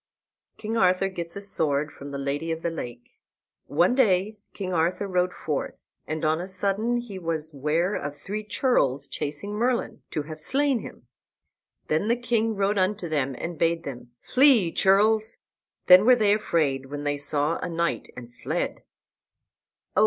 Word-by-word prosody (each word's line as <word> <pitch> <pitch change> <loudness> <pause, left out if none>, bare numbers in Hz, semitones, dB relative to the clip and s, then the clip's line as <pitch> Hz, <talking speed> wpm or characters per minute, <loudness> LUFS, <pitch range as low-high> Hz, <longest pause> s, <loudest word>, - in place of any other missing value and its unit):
KING 225 +1 -3
ARTHUR 185 -1 +3
GETS 170 -3 -6
A 200 - -4
SWORD 150 -6 +1
FROM 140 - -10
THE 140 - -5
LADY 140 +4 -2
OF 160 0 -4
THE 170 - 0
LAKE 120 -6 -8 0.5
One 170 +9 +3
day 210 -4 +2 0.2
King 185 -2 -4
Arthur 175 +4 +1
rode 180 -1 +1
forth, 150 -5 -4 0.2
and 155 0 -3
on 155 +2 +1
a 180 - -5
sudden 200 +5 0
he 230 -6 -6
was 160 -2 -2
ware 155 +7 0
of 145 -5 -4
three 210 +8 -5
churls 210 - +1
chasing 150 +7 -4
Merlin, 240 +3 -1
to 150 - -3
have 155 +1 -9
slain 275 - +1
him. - - -11 0.8
And 160 +8 0
the 235 - +4
king 230 -2 0
rode 200 +1 +1
unto 185 0 0
them 140 -4 -1
and 170 0 -5
bade 165 0 +1
them, 125 -4 -8
"Flee, 255 - +5
churls!" 215 +4 +3 0.5
Then 180 +2 +8
were 250 +3 +7
they 210 -4 +3
afraid 150 -10 0
when 145 +1 -6
they 145 0 -1
saw 145 +3 0
a 180 - -4
knight, 170 0 -2
and 120 -1 -10
fled. - - -2
175 Hz, 165 wpm, -25 LUFS, 150-210 Hz, 0.8 s, Then